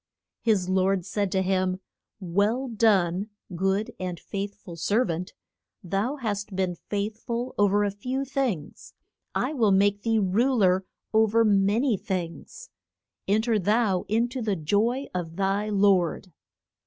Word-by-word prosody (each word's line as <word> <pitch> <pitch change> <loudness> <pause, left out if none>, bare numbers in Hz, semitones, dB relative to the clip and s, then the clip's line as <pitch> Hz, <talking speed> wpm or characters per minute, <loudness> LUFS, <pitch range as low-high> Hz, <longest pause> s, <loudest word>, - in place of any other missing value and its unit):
His 210 -6 +2
lord 185 -1 +1
said 200 0 -1
to 190 -1 +2
him, 185 0 0 0.4
Well 205 +8 0
done, 205 -4 +2 0.3
good 195 +4 0
and 180 -2 -4
faith 200 0 -5
ful 170 - -11
ser 205 +9 +1
vant, 175 +2 -4 0.5
thou 200 - -1
hast 205 -6 -4
been 185 -1 0
faith 205 +5 -4
ful 240 +2 -3
o 205 - +6
ver 205 +1 +2
a 205 - 0
few 255 +7 -3
things, 260 - -3 0.4
I - - 0
will 230 -7 +3
make 200 +1 +3
thee 225 0 +1
ru 220 +7 +2
ler 190 -3 +3 0.3
o 220 0 +5
ver 225 +2 +3
ma 200 0 +3
ny 245 -4 +2
things; 190 - -5 0.6
en 210 +3 +2
ter 225 -2 +2
thou 205 -1 +1
in 225 +3 +2
to 255 +1 -5
the 210 -3 0
joy 210 - 0
of 170 -3 -4
thy 200 +2 0
lord. 195 -3 +2
200 Hz, 155 wpm, -26 LUFS, 185-225 Hz, 0.6 s, o